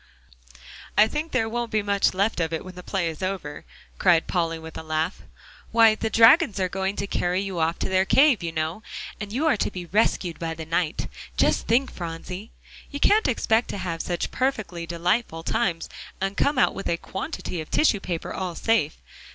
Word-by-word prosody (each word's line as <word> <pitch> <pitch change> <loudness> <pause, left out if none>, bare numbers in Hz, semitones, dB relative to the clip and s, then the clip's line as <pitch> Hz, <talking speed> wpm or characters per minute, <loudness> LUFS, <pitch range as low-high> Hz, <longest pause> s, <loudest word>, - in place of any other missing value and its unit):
"I 210 - +7
think 300 +5 -3
there 225 - +1
won't 240 +1 -2
be 215 -1 0
much 200 -2 +2
left 200 +1 +1
of 165 -1 0
it 160 - -3
when 185 - -9
the 180 - -9
play 185 -1 -1
is 160 +1 -5
over," 185 -6 -4 0.3
cried 165 -2 +4
Polly 165 -2 -1
with 160 0 -10
a - - -5
laugh; 160 +3 -2 0.5
"why, 225 -1 +6
the 220 +1 -2
dragons 230 - +6
are 185 - +2
going 190 +2 -2
to 200 - -2
carry 180 -2 0
you 195 -3 -3
off 165 +1 +1
to - - -2
their 190 0 +3
cave, 270 +2 +4
you 170 -1 -3
know, 160 +5 -2 0.4
and 210 -1 -6
you 270 +8 0
are 310 -8 +3
to - - 0
be 180 -1 -7
rescued 180 -2 +1
by 165 -1 -3
the 160 -1 -7
knight, 165 0 -1 0.3
just - - +2
think, 250 +4 +2
Phronsie! 180 +4 -6 0.4
You 285 - -5
can't 430 +8 +4
expect 230 -2 +1
to - - -4
have 170 -3 -3
such 175 -1 -2
perfectly 215 -10 -2
delightful 170 0 -1
times, 170 -4 0 0.3
and 195 +1 -2
come 285 +5 +1
out 250 - +4
with 195 - -4
a 170 - +1
quantity 190 - -5
of 155 - -9
tissue 235 -9 +3
paper 175 -4 -4
all 180 -2 -4
safe. 220 -9 +1
190 Hz, 200 wpm, -25 LUFS, 170-225 Hz, 0.5 s, I